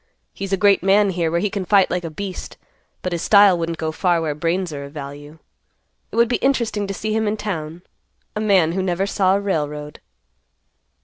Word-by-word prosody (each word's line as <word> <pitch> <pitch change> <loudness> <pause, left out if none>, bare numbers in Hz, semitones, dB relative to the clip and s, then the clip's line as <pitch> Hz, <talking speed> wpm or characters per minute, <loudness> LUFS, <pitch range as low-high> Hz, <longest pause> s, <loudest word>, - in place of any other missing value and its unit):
He's 195 0 -6
a 195 - +2
great 200 +1 +4
man 195 +2 +3
here, 170 -2 -1
where 170 +1 0
he 205 +2 -1
can 200 -1 -3
fight 195 0 +3
like 180 0 -1
a 165 - -4
beast, 185 +4 -7 0.5
but 185 - -2
his 170 -1 -2
style 200 -3 +6
wouldn't 165 -1 -3
go 160 0 -2
far 175 +1 +1
where 160 -2 -1
brains 170 +3 -2
are 140 -1 -5
of 140 - -12
value. 145 +1 -9 0.7
It - - -8
would 235 +1 +4
be 245 - 0
interesting 235 -6 0
to 195 - -3
see 215 +2 -3
him 220 0 0
in 210 +1 -1
town; 170 -5 -5 0.5
a - - -2
man 190 -6 +3
who 190 +2 -1
never 185 0 0
saw 190 -1 +2
a - - +1
railroad." 150 -6 -3
185 Hz, 210 wpm, -21 LUFS, 160-200 Hz, 0.7 s, style